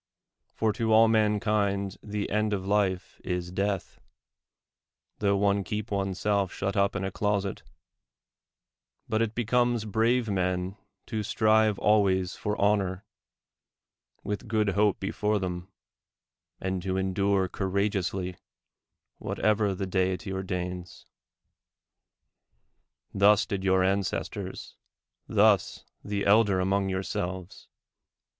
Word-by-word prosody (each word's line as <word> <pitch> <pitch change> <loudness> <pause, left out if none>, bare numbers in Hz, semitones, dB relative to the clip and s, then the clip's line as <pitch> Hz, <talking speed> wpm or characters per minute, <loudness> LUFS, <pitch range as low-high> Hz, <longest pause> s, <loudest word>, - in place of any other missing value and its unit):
For 110 -1 +1
to 115 -1 -1
all 110 +1 +7
mankind 105 -3 +1
the 105 -1 -3
end 105 +1 +1
of 95 -2 -2
life 100 -2 0
is 90 -1 -3
death, 95 0 -2 1.2
tho 100 -1 +2
one 100 0 +2
keep 105 +3 -4
one's 95 -2 -1
self 100 -3 +1
shut 95 0 -3
up 100 0 +2
in 100 - -2
a 95 - -2
closet; 100 -1 -1 1.5
but 110 +1 0
it 115 -1 -1
becomes 120 -1 +1
brave 115 +3 +1
men 90 -1 -1 0.3
to 110 -2 -3
strive 110 0 +3
always 95 -4 +2
for 105 0 -3
honor, 100 -1 +1 1.2
with 105 +4 -4
good 110 -1 +1
hope 100 +1 +2
before 105 +2 0
them, 90 0 -4 0.9
and 95 -1 -2
to 95 +1 -2
endure 95 0 +1
courageously 95 -1 -2 0.8
whatever 105 -2 0
the 95 - -3
Deity 95 +1 -1
ordains. 90 -2 -5 2.1
Thus 100 +1 +5
did 95 -2 -3
your 95 -1 +3
ancestors, 95 0 -2 0.5
thus 105 -3 +3 0.2
the 100 -1 -2
elder 100 -2 +4
among 95 +1 +1
yourselves. 95 -1 -4
100 Hz, 110 wpm, -28 LUFS, 95-105 Hz, 2.1 s, all